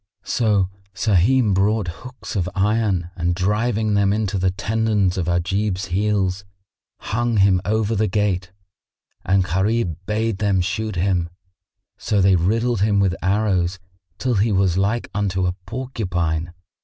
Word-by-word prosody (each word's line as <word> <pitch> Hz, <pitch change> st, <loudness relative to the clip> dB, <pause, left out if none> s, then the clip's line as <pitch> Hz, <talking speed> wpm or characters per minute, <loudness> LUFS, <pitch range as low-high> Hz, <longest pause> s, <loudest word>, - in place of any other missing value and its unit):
So 105 Hz, -5 st, +1 dB, 0.3 s
Sahim 105 Hz, +3 st, +3 dB
brought 100 Hz, +1 st, +1 dB
hooks 125 Hz, -1 st, -9 dB
of 90 Hz, -3 st, 0 dB
iron 95 Hz, -3 st, +1 dB
and 85 Hz, 0 st, -1 dB
driving 105 Hz, +3 st, 0 dB
them 100 Hz, -1 st, +3 dB
into 105 Hz, -2 st, -1 dB
the 95 Hz, 0 st, +2 dB
tendons 105 Hz, -1 st, 0 dB
of 90 Hz, -3 st, -2 dB
Ajib's 90 Hz, +3 st, 0 dB
heels, 100 Hz, -1 st, 0 dB, 0.6 s
hung 120 Hz, +1 st, -1 dB
him 95 Hz, -2 st, +4 dB
over 110 Hz, +1 st, 0 dB
the 110 Hz, +1 st, +1 dB
gate; 95 Hz, -2 st, -1 dB, 0.7 s
and 95 Hz, +1 st, +2 dB
Gharib 95 Hz, 0 st, 0 dB
bade 110 Hz, -1 st, -1 dB
them 100 Hz, -3 st, +2 dB
shoot 100 Hz, +3 st, -2 dB
him; 90 Hz, -2 st, 0 dB, 0.7 s
so 105 Hz, -, 0 dB
they 95 Hz, 0 st, +5 dB
riddled 110 Hz, +5 st, +1 dB
him 100 Hz, -1 st, +3 dB
with 95 Hz, -2 st, +2 dB
arrows, 95 Hz, -2 st, +1 dB, 0.4 s
till 125 Hz, -1 st, -1 dB
he 105 Hz, +1 st, +2 dB
was 95 Hz, -3 st, +2 dB
like 100 Hz, +5 st, 0 dB
unto 95 Hz, -2 st, 0 dB
a 90 Hz, -, 0 dB
porcupine. 90 Hz, -9 st, -2 dB
100 Hz, 140 wpm, -21 LUFS, 90-110 Hz, 0.7 s, they